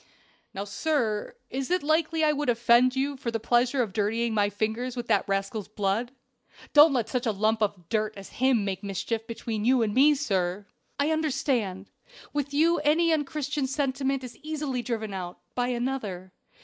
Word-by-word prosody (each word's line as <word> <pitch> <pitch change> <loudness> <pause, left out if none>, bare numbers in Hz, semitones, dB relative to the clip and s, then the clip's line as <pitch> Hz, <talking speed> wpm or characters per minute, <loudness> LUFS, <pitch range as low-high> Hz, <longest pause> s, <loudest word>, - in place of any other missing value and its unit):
"Now, 195 - -4
sir, 220 -1 -1 0.2
is 265 0 -3
it 360 -2 +1
likely 315 +1 +1
I 305 - +5
would 295 -2 -1
offend 240 +2 +4
you 280 +2 0
for 255 -3 -4
the 230 -1 -2
pleasure 245 +3 +2
of 205 -5 -6
dirtying 225 +3 0
my 205 -1 +2
fingers 220 +5 -2
with 240 -1 -4
that 205 -3 +2
rascal's 195 +1 -2
blood? 215 +3 -1 0.6
Don't 295 +1 +8
let 240 -4 0
such 250 -1 -2
a - - +3
lump 215 +2 +1
of 195 -5 -1
dirt 215 +1 -1
as 195 - -9
him 255 -6 +3
make 195 0 -3
mischief 220 +3 -3
between 225 -2 -4
you 250 0 +4
and 210 -2 -1
me, 290 +5 +6
sir." 195 -8 -1 0.3
"I 290 +2 +2
understand! 250 -11 -1 0.4
with 290 -1 -2
you 325 +3 +3
any 320 +3 +3
unchristian 295 -2 -1
sentiment 270 -1 -1
is 250 - -9
easily 300 -5 -3
driven 220 -4 -3
out 180 -2 -5 0.2
by 245 0 0
another. 235 -7 -3
240 Hz, 175 wpm, -27 LUFS, 210-285 Hz, 0.6 s, Don't